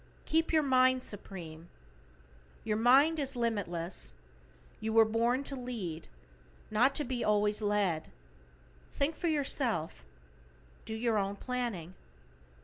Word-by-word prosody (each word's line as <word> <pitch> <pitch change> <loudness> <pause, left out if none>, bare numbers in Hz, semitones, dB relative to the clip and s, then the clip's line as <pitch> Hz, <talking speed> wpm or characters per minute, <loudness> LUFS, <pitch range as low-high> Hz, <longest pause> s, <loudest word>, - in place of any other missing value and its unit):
=KEEP 325 +1 +1
YOUR 315 -2 +3
MIND 255 -1 +3
SUPREME:= 175 -6 -8 0.9
Your 215 -1 -1
mind 275 +8 +5
is 275 -2 0
limitless. 190 - -2 0.6
You 220 0 -3
were 225 0 +7
born 235 +4 +1
to 275 - 0
lead, 225 -11 -5 0.6
not 245 +6 +3
to 295 - +1
be 250 -2 -3
always 210 0 +2
led. 205 -6 0 0.8
Think 290 +3 -1
for 345 - -2
yourself. 260 - 0 0.8
Do 220 - -5
your 225 -1 +1
own 195 0 -2
planning. 230 -8 -4
225 Hz, 120 wpm, -31 LUFS, 200-260 Hz, 0.9 s, were